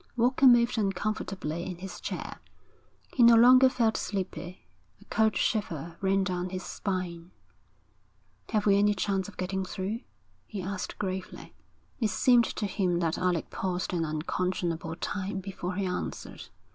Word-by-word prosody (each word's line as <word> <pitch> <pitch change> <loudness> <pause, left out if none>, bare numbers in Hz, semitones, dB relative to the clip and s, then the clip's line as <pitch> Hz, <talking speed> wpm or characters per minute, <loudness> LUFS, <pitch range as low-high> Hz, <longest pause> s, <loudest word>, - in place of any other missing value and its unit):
Walker 255 +3 +4
moved 240 -1 +5
uncomfortably 195 -4 -2
in 180 -1 -5
his 190 +2 -8
chair. - - -5 0.7
He 255 - +1
no 235 0 +9
longer 255 +3 +8
felt 230 -4 +1
sleepy. 180 -3 -4 0.3
A - - -18
cold 220 -1 +3
shiver 170 - -1
ran 195 0 +2
down 180 -1 -2
his 185 0 -5
spine. 180 -3 -4 1.2
'Have 210 -2 0
we 200 -1 +5
any 205 0 +3
chance 195 -1 -1
of 205 - -12
getting 190 +1 -2
through?' 195 +5 -4 0.5
he 210 - -6
asked 190 0 -4
gravely. 190 -2 -5 0.5
It 220 -4 +1
seemed 240 0 +4
to 210 - -3
him 185 -3 0
that 165 -1 0
Alec 180 -3 0
paused 185 -1 -2
an 170 -2 0
unconscionable 165 +1 -2
time 195 +2 -3
before 185 -1 -5
he 200 0 -1
answered. 180 -1 -5
190 Hz, 145 wpm, -29 LUFS, 180-215 Hz, 1.2 s, no